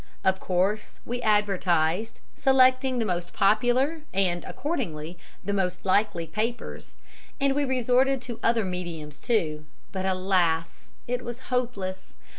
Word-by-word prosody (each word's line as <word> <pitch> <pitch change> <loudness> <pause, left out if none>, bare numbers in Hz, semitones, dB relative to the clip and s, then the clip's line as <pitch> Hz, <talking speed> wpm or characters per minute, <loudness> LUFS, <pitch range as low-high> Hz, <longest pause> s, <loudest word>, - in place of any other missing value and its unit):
Of 190 0 +2
course, 190 +4 -1
we 245 +1 -3
advertised, 195 -3 +1
selecting 260 -1 +4
the 230 - +1
most 175 -3 -2
popular 245 +10 +2
and, 180 -3 +2
accordingly, 175 - -3 0.3
the 200 - 0
most 185 -2 -1
likely 190 -3 +2
papers, 220 +8 -4 0.4
and 275 -1 +3
we 290 +1 +1
resorted 260 +1 +2
to 240 -3 -6
other 230 -2 +2
mediums, 170 -5 -5
too, 155 -10 0 0.3
but, 190 0 -2
alas! 185 -3 0 0.2
it 250 +1 -1
was 240 0 -6
hopeless. 200 -7 -2
205 Hz, 125 wpm, -26 LUFS, 180-245 Hz, 0.4 s, selecting